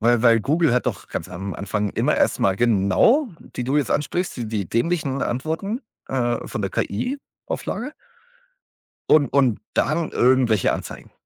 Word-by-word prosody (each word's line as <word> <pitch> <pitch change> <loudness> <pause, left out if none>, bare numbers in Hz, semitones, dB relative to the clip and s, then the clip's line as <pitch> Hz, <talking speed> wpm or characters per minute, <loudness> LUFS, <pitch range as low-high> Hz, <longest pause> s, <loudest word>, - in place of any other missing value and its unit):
weil 120 +1 +3
weil 115 -2 +5
Google 155 +4 +2
hat 125 - 0
doch - - -3
ganz - - -5
am 95 +2 -6
Anfang 105 +1 -2
immer - - +1
erst - - +1
mal 95 -1 +2
genau 120 - +3 0.3
die 125 - -2
du 135 +3 0
jetzt 145 -4 +1
ansprichst, 175 +5 -1
die 120 -3 -4
die 105 -5 -3
dämlichen 140 +1 0
Antworten, 160 - -2 0.3
äh, 120 -2 0
von 110 - -4
der 95 - -2
KI-Auflage 260 - -4 1.2
und 145 -3 +5
und 130 -6 +3
dann 160 +1 0
irgendwelche 125 -5 +3
Anzeigen. - - -7
125 Hz, 155 wpm, -22 LUFS, 110-155 Hz, 1.2 s, weil